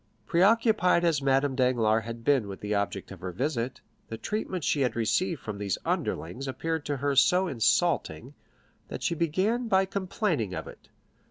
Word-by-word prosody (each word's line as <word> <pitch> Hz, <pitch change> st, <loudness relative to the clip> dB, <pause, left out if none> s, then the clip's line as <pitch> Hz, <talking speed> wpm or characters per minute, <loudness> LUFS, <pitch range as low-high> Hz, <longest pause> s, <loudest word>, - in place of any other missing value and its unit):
Preoccupied 200 Hz, -1 st, +3 dB
as 160 Hz, -4 st, +2 dB
Madame 135 Hz, 0 st, +2 dB
Danglars 115 Hz, -4 st, +2 dB
had 115 Hz, 0 st, -7 dB
been 135 Hz, -5 st, +2 dB
with 95 Hz, -1 st, -7 dB
the 105 Hz, 0 st, -2 dB
object 100 Hz, -2 st, -2 dB
of 95 Hz, -, -9 dB
her 90 Hz, +1 st, -5 dB
visit, 125 Hz, -, -2 dB, 0.3 s
the 115 Hz, -, -6 dB
treatment 185 Hz, -, -3 dB
she 145 Hz, -, +1 dB
had 125 Hz, -, +1 dB
received 140 Hz, -, 0 dB
from 105 Hz, -2 st, -6 dB
these 100 Hz, -3 st, -1 dB
underlings 90 Hz, -, -2 dB
appeared 160 Hz, +3 st, -3 dB
to 145 Hz, -1 st, -1 dB
her 140 Hz, +1 st, -1 dB
so 180 Hz, +7 st, +4 dB
insulting, 120 Hz, -9 st, 0 dB, 0.5 s
that -, -, -7 dB
she -, -, +1 dB
began 185 Hz, +9 st, 0 dB
by 190 Hz, -2 st, +3 dB
complaining 185 Hz, -, -2 dB
of 80 Hz, -, -5 dB
it. -, -, -13 dB
135 Hz, 170 wpm, -28 LUFS, 110-180 Hz, 0.5 s, so